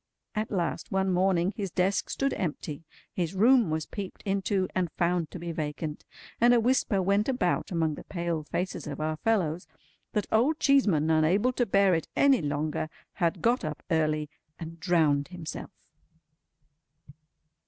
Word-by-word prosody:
At 215 Hz, +1 st, -2 dB
last, 170 Hz, -8 st, -2 dB
one 190 Hz, 0 st, +1 dB
morning, 185 Hz, +1 st, +2 dB
his 200 Hz, -3 st, -3 dB
desk 185 Hz, +3 st, 0 dB
stood 275 Hz, 0 st, 0 dB
empty, 155 Hz, -2 st, -4 dB, 0.3 s
his 175 Hz, 0 st, -2 dB
room 235 Hz, +1 st, +5 dB
was 155 Hz, 0 st, -1 dB
peeped 200 Hz, -3 st, -7 dB
into, 195 Hz, -1 st, 0 dB
and 180 Hz, -3 st, -1 dB
found 170 Hz, -2 st, 0 dB
to -, -, -8 dB
be 170 Hz, 0 st, -5 dB
vacant, 150 Hz, -1 st, -4 dB, 0.4 s
and 240 Hz, +1 st, +6 dB
a -, -, +5 dB
whisper 230 Hz, -4 st, +2 dB
went 200 Hz, +5 st, +2 dB
about 215 Hz, -9 st, 0 dB
among 165 Hz, -4 st, 0 dB
the -, -, -8 dB
pale 170 Hz, -3 st, -3 dB
faces 175 Hz, +4 st, -4 dB
of 145 Hz, -, -5 dB
our 155 Hz, 0 st, -1 dB
fellows 180 Hz, -5 st, 0 dB, 0.5 s
that 210 Hz, -, 0 dB
Old 265 Hz, +8 st, +3 dB
Cheeseman, 200 Hz, -, +3 dB
unable 180 Hz, +11 st, +3 dB
to 245 Hz, -1 st, 0 dB
bear 195 Hz, -1 st, +4 dB
it 165 Hz, -2 st, -1 dB
any 275 Hz, -6 st, +4 dB
longer, 150 Hz, +1 st, -2 dB, 0.2 s
had 170 Hz, -2 st, -1 dB
got 240 Hz, 0 st, +2 dB
up 155 Hz, -2 st, -5 dB
early 155 Hz, -1 st, +1 dB, 0.3 s
and 165 Hz, 0 st, -8 dB
drowned 150 Hz, -4 st, +2 dB
himself. 175 Hz, -3 st, -7 dB
180 Hz, 155 wpm, -28 LUFS, 155-205 Hz, 0.5 s, and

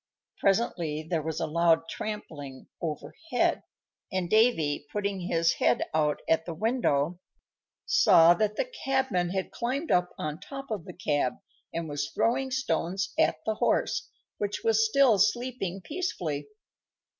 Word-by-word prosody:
Presently 175 Hz, -7 st, +1 dB
there 165 Hz, -1 st, 0 dB
was 160 Hz, +1 st, -3 dB
a -, -, 0 dB
loud 165 Hz, +1 st, +2 dB
trampling 145 Hz, -11 st, -6 dB, 0.2 s
overhead, 245 Hz, -, -1 dB, 0.5 s
and 185 Hz, -2 st, -2 dB
Davy, 165 Hz, -11 st, +3 dB
putting 200 Hz, -2 st, -2 dB
his 165 Hz, -2 st, +1 dB
head -, -, +2 dB
out 150 Hz, -1 st, +1 dB
at 160 Hz, +1 st, +2 dB
the 165 Hz, -, -4 dB
window, 175 Hz, -, 0 dB, 0.7 s
saw 165 Hz, +1 st, +6 dB
that 215 Hz, +2 st, 0 dB
the -, -, 0 dB
cabman 265 Hz, -, -1 dB
had 190 Hz, +1 st, -3 dB
climbed 265 Hz, +7 st, -2 dB
up 180 Hz, 0 st, +3 dB
on 155 Hz, +1 st, -4 dB
top 275 Hz, +4 st, -8 dB
of 205 Hz, -7 st, -3 dB
the -, -, -8 dB
cab 145 Hz, -8 st, 0 dB, 0.4 s
and 165 Hz, -1 st, -3 dB
was 145 Hz, -1 st, -3 dB
throwing 265 Hz, +3 st, +1 dB
stones 195 Hz, -8 st, -1 dB
at 160 Hz, 0 st, +2 dB
the 220 Hz, -, +1 dB
horse, 215 Hz, -, 0 dB, 0.3 s
which 205 Hz, 0 st, -2 dB
was 225 Hz, -1 st, +4 dB
still 225 Hz, -1 st, +4 dB
sleeping 240 Hz, -5 st, 0 dB
peacefully. 180 Hz, -, -3 dB
185 Hz, 140 wpm, -28 LUFS, 160-230 Hz, 0.7 s, saw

